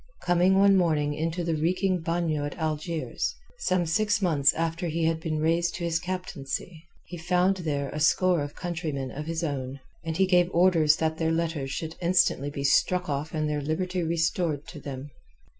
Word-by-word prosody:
Coming 180 +2 +3
one 195 0 +6
morning 155 -5 +1
into 165 +3 -2
the 165 -1 0
reeking 180 +4 +1
bagnio 165 -3 -1
at 145 - -6
Algiers, 160 0 -2 0.2
some 185 - +1
six 210 +6 +1
months 155 -8 +3
after 165 +1 -2
he 165 +1 -1
had 160 0 +1
been 160 -1 -2
raised 165 +2 +1
to 175 - -5
his 165 -1 0
captaincy, 175 -2 -5 0.2
he 175 - -8
found 180 +3 +2
there 145 -5 -2
a 150 - -5
score 175 +2 +3
of 145 0 -5
countrymen 160 -7 -4
of 150 +2 -6
his 165 +1 -2
own, 135 -3 -3 0.2
and 165 -1 -3
he 190 - +4
gave 180 -2 +3
orders 170 -3 +4
that 160 0 -1
their 160 -1 +1
letters 165 -4 -1
should 160 +3 -5
instantly 175 -5 +2
be 140 -1 -5
struck 180 +6 +2
off 145 +3 -3
and 155 -1 0
their 150 -1 -1
liberty 180 +5 -2
restored 165 -2 0
them. 145 -3 -8
165 Hz, 180 wpm, -27 LUFS, 150-175 Hz, 0.2 s, one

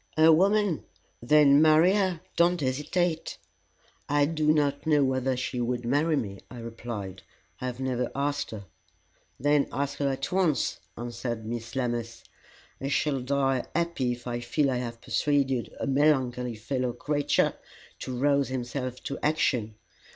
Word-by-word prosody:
"A 160 +1 +7
woman? 195 0 +2 0.4
Then 145 +3 +6
marry 160 +4 +6
her. 190 -5 0
Don't 175 +1 +3
hesitate." 155 +5 -1 0.7
"I 145 0 +3
do 155 0 +1
not 145 -1 0
know 150 -2 +4
whether 130 -1 0
she 125 0 -2
would 120 0 -2
marry 150 +6 +2
me," 100 -8 -3
I 125 - -10
replied. 115 -5 -6 0.4
"I 130 - -3
have 125 0 -5
never 125 -2 -1
asked 145 +1 -1
her." 105 -3 -8 0.7
"Then 145 +1 +3
ask 140 +1 -3
her 140 -1 +1
at 135 0 -3
once," 180 -6 +1 0.2
answered 120 -1 -4
Miss 115 0 -5
Lammas. 120 -2 -3 0.6
"I 135 - -2
shall 140 0 +1
die 135 -1 +1
happy 170 -7 0
if 120 0 -11
I 120 -1 -3
feel 125 +4 0
I 125 - 0
have 120 -2 -5
persuaded 135 -4 0
a - - -2
melancholy 130 -4 +1
fellow 125 +3 -2
creature 145 +2 +1 0.5
to 130 -1 -5
rouse 140 +1 +2
himself 130 0 -4
to 140 - -4
action. 125 -8 +1
135 Hz, 150 wpm, -27 LUFS, 120-150 Hz, 0.7 s, A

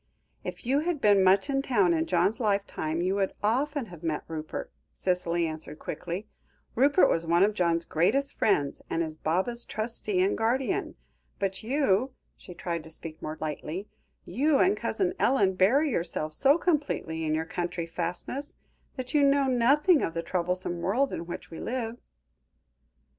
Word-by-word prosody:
"If - - -7
you 270 +4 +2
had 330 0 -1
been 205 -5 +5
much 190 +5 +4
in 270 -1 +1
town 205 -10 +3
in 160 0 0
John's 185 +5 +2
lifetime 200 -7 -1
you 185 +1 +1
would 195 -1 0
often 275 +5 +1
have 165 - -11
met 160 -3 -2
Rupert," 155 -1 -5 0.2
Cicely 175 -2 0
answered 155 -1 -6
quickly. 180 +6 -5 0.5
"Rupert 280 +8 +5
was 165 0 0
one 170 +2 +4
of 210 +1 +3
John's 170 -3 +1
greatest 270 - +1
friends, 145 -10 +1
and 165 - 0
is 155 -1 -5
Baba's 190 +10 0
trustee 215 -3 -2
and 190 +2 +2
guardian. 245 +4 0 0.4
But 195 -1 -2
you," 255 -1 +1 0.2
she 180 - -12
tried 170 -1 -3
to - - -10
speak 160 0 -8
more 155 +1 -5
lightly, 160 +5 -4 0.4
"you 280 - +2
and 385 +7 +4
Cousin 370 -4 -1
Ellen 205 -7 +3
bury 260 +12 +3
yourselves 165 -5 -2
so 280 - +4
completely 285 - -1
in 155 0 0
your 160 +1 -1
country 175 0 -3
fastness, 175 - -3 0.4
that 255 -1 -5
you 295 - +4
know 280 0 +4
nothing 275 +6 +4
of 165 - -2
the 165 - -2
troublesome 180 -1 -2
world 250 +10 +1
in 170 - -5
which 175 - -7
we 165 - -7
live." 235 -1 -3
195 Hz, 165 wpm, -28 LUFS, 170-260 Hz, 0.5 s, been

